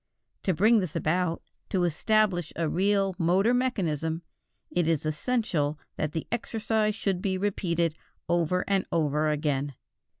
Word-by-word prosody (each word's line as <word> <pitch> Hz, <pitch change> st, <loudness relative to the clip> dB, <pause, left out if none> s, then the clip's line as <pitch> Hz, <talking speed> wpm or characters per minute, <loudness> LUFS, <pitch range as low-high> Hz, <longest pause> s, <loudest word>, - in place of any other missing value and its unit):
To 185 Hz, -, +3 dB
bring 220 Hz, +6 st, +5 dB
this 180 Hz, -6 st, -3 dB
about, 170 Hz, +1 st, 0 dB, 0.3 s
to 185 Hz, -4 st, +1 dB
establish 175 Hz, 0 st, +2 dB
a 165 Hz, -1 st, 0 dB
real 195 Hz, +3 st, +2 dB
motor 185 Hz, +7 st, +3 dB
mechanism, 170 Hz, -, 0 dB, 0.5 s
it 175 Hz, -2 st, +1 dB
is 160 Hz, -2 st, +1 dB
essential 155 Hz, -, 0 dB, 0.2 s
that 155 Hz, -, -2 dB
the 160 Hz, -, -3 dB
exercise 220 Hz, -2 st, 0 dB
should 190 Hz, -3 st, -1 dB
be 190 Hz, -1 st, 0 dB
repeated 170 Hz, -4 st, 0 dB, 0.3 s
over 175 Hz, +1 st, +1 dB
and 195 Hz, -1 st, +1 dB
over 155 Hz, -1 st, +1 dB
again. 145 Hz, -2 st, -1 dB
175 Hz, 135 wpm, -28 LUFS, 155-200 Hz, 0.5 s, bring